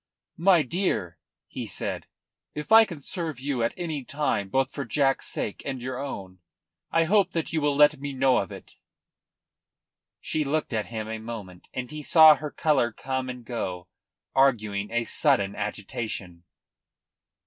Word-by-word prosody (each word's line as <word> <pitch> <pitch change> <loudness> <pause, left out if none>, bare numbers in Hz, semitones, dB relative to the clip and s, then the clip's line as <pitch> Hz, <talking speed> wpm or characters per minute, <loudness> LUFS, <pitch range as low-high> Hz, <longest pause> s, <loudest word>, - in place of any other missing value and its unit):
"My 175 -2 +5
dear," 115 - -2 0.3
he - - -6
said, - - -4 0.5
"if 150 +6 -6
I 225 0 +9
can 170 -8 -9
serve 160 -3 -3
you 135 -2 -2
at 115 - 0
any 160 -6 -3
time, 125 -8 -1
both 135 +4 +1
for 140 - -3
Jack's 135 +2 +1
sake 105 - -3
and 135 -2 -4
your 130 +1 -5
own, 95 -9 -6 0.5
I 165 - +3
hope 200 +4 +2
that 165 -1 -2
you 160 - +1
will 145 -1 +1
let 150 0 +5
me 140 0 -4
know 130 -1 +3
of 95 - -2
it." - - -12 1.4
She 155 - -1
looked 150 -1 -1
at 110 -1 -1
him 110 -2 -5
a 110 0 -4
moment, 105 -6 -9
and 125 -1 -5
he 155 0 -6
saw 155 +1 +8
her 150 +1 -5
colour 140 -6 +1
come 130 +3 -3
and 125 -2 -7
go, 90 -7 -4 0.4
arguing 105 -7 +2
a 120 +1 0
sudden 115 -7 +2
agitation. 100 -4 -5
130 Hz, 160 wpm, -26 LUFS, 110-150 Hz, 1.4 s, I